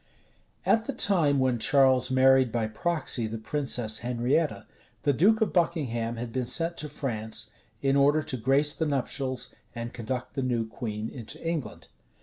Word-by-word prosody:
At 225 0 +3
the - - -3
time 160 -8 +3
when 130 -3 +1
Charles 130 -1 +4
married 130 -1 +4
by 115 -1 0
proxy 120 0 -1
the 110 +1 -5
princess 115 -2 0
Henrietta, 125 +6 0 0.4
the 145 - +3
duke 210 - +3
of 220 - +1
Buckingham 130 -10 0
had 115 0 -5
been 125 0 -2
sent 170 +4 0
to 150 - -4
France, 110 -6 -4 0.3
in 135 0 +3
order 145 +2 +4
to 130 - -3
grace 135 +5 +2
the 160 - -1
nuptials, 130 -2 -2 0.2
and 120 0 -5
conduct 125 +2 -4
the 135 - -2
new 120 -3 -1
queen 110 -2 -5
into 125 +5 -9
England. 165 -5 -4
130 Hz, 160 wpm, -27 LUFS, 120-150 Hz, 0.4 s, Charles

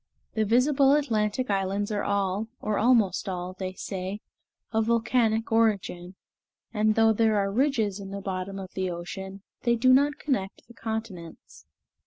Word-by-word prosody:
The 220 -1 +1
visible 270 +5 +4
Atlantic 230 -4 0
islands 195 +1 -1
are 205 -1 -1
all, 200 +1 0
or 210 -1 -1
almost 215 -6 +3
all, 180 0 -4
they 185 -1 -3
say, 190 +1 -5 0.5
of 220 -1 +1
volcanic 230 -1 +1
origin; 195 -5 0 0.6
and 215 0 +2
though 225 0 +5
there 220 -1 +2
are 195 -1 0
ridges 225 -5 +1
in 195 -1 -8
the 200 +1 -5
bottom 195 0 -4
of 190 -1 -7
the 185 -1 -2
ocean, 190 +3 -7 0.2
they 235 0 +2
do 255 +2 +4
not 285 +2 +3
connect 200 -10 -3
the 235 - -15
continents. 185 - -7
210 Hz, 155 wpm, -27 LUFS, 190-230 Hz, 0.6 s, though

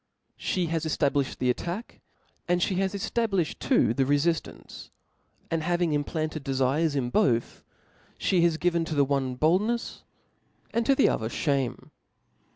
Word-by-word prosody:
She 180 -2 -1
has 165 -1 -2
cflabliflied 145 -3 0
the 125 -1 +2
attack* 175 - -5 0.5
and 175 0 +2
ftie 180 +1 0
has 195 +1 0
cftablUhed 200 -4 -1
too 110 - +2
the 135 - +1
rcfiftance; 145 +4 -2 0.6
and 165 -1 0
having 175 -1 0
implanted 155 +1 -2
dcfircs 135 +4 +1
in 125 -3 -1
both, 120 -2 +1 0.6
flic 180 -3 +2
has 170 -2 +3
given 170 0 +1
to 155 - -4
the 140 -1 +4
one 135 -2 -1
boldnefs, 205 - +1 0.7
and 230 0 0
to 275 - +5
the 270 - +4
other 110 0 -1
fljanie. 135 -3 -2
160 Hz, 145 wpm, -27 LUFS, 140-175 Hz, 0.7 s, to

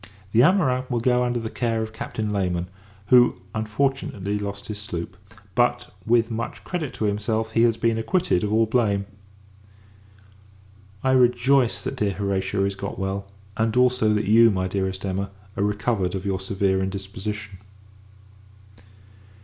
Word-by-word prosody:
The 110 - +3
amorins 130 -6 +3
will 120 -2 0
go 125 +1 +2
under 120 -1 0
the 110 -1 -5
care 115 -2 -1
of 110 0 -7
Captain 110 -1 -4
Layman; 90 -3 0 0.4
who, 125 -1 +5
unfortunately, 110 -3 -1
lost 100 0 -5
his 105 -1 -5
sloop: 90 -2 -5 0.4
but, 120 +1 +1
with 115 0 +3
much 115 +1 -4
credit 160 -7 -3
to 110 - -2
himself, 110 +2 -1
he 115 - +2
has 115 -1 +3
been 115 -1 +1
acquitted 115 - +1
of 105 - -1
all 110 +1 +4
blame. 105 -4 +1 2.0
I 130 - +3
rejoice 125 0 +3
that - - -5
dear 100 -2 0
Horatia 95 0 -1
is 100 - -1
got 100 +1 -6
well; 95 +1 -3 0.3
and, 115 +2 0
also, 125 -3 +3
that 105 - 0
you, 115 +3 +6
my 95 -3 0
dearest 95 0 -2
Emma, 100 +1 -2 0.3
are 100 - 0
recovered 105 -2 0
of 95 0 -5
your 95 -1 -1
severe 95 0 0
indisposition. 100 +1 -5
110 Hz, 150 wpm, -24 LUFS, 100-120 Hz, 2.0 s, you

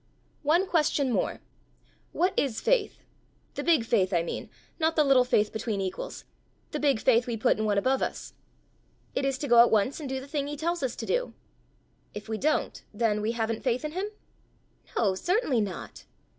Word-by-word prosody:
"One 330 +6 +3
question 300 -6 +1
more: - - -1 0.7
what 365 +3 +1
is 260 -6 0
faith - - 0 0.5
the - - -4
big 320 -9 +3
faith 200 -5 +2
I 170 -1 +2
mean 170 - -5 0.3
not 320 0 +1
the 305 - +5
little 270 -3 +5
faith 215 -4 +1
between 220 -2 -2
equals 190 -1 -5 0.5
the 300 - -3
big 280 -6 +2
faith 245 0 +3
we 235 -2 -2
put 215 - +2
in 215 - 0
one 205 -1 +1
above 260 +6 +2
us?" - - -4 0.8
"It 275 - -1
is 270 -1 0
to 285 - -4
go 240 -2 +6
at 235 - +6
once 220 +7 +1
and 290 -4 -6
do 265 0 -2
the 265 - -10
thing 285 -1 -2
he 295 0 -5
tells 340 +2 -1
us 260 -3 -2
to - - -5
do." - - -1 0.8
"If 210 +1 -7
we 220 -1 -3
don't, 305 +3 0
then 210 -1 0
we 220 +2 -1
haven't 225 -1 -2
faith 255 +2 0
in 305 - -3
him?" 375 +5 -3 0.9
"No; 205 -5 +3
certainly 325 - +1
not." 195 -4 -6
260 Hz, 195 wpm, -28 LUFS, 220-300 Hz, 0.9 s, go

